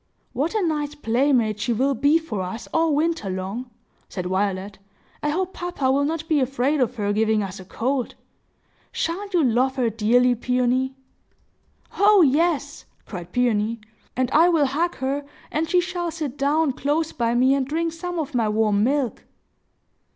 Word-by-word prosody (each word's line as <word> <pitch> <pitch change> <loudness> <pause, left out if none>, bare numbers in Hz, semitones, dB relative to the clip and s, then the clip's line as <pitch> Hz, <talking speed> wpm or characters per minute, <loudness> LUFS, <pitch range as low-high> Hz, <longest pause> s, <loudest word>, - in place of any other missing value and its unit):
"What 310 - -1
a 425 - +1
nice 295 -2 -2
playmate 240 -4 +1
she 235 +3 0
will 265 +5 +1
be 285 +6 +3
for 275 -12 -4
us, 185 +5 -6
all 325 -2 +2
winter 320 -8 0
long!" 195 +7 -4 0.4
said 180 -2 -5
Violet. 190 +1 -2 0.4
"I 295 - 0
hope 370 +4 -1
papa 350 -7 -1
will 280 +1 +2
not 320 +1 -3
be 310 -2 +2
afraid 270 +2 0
of 250 0 0
her 205 -2 -1
giving 215 0 +2
us 195 0 -6
a 185 - -10
cold! 250 +6 -2 0.8
Sha'n't 390 +3 -3
you 335 - +4
love 255 +2 +2
her 245 -4 +1
dearly, 240 +3 +3
Peony?" 250 +2 0 1.0
"Oh 405 -2 +6
yes!" 295 0 +1 0.2
cried 175 -4 -8
Peony. 230 -2 +1 0.4
"And 255 -1 0
I 330 +3 +5
will 320 -4 +3
hug 320 +6 -1
her, 275 +2 -2 0.3
and 315 +1 -1
she 360 - +4
shall 350 -1 -2
sit 310 -5 -5
down 290 +2 +1
close 295 +5 -1
by 235 -1 0
me 260 +2 +4
and 275 -1 +1
drink 325 +3 -1
some 350 +1 -5
of 310 -3 -3
my 230 -3 +1
warm 210 -1 +2
milk!" 270 0 0
265 Hz, 170 wpm, -23 LUFS, 230-320 Hz, 1.0 s, Oh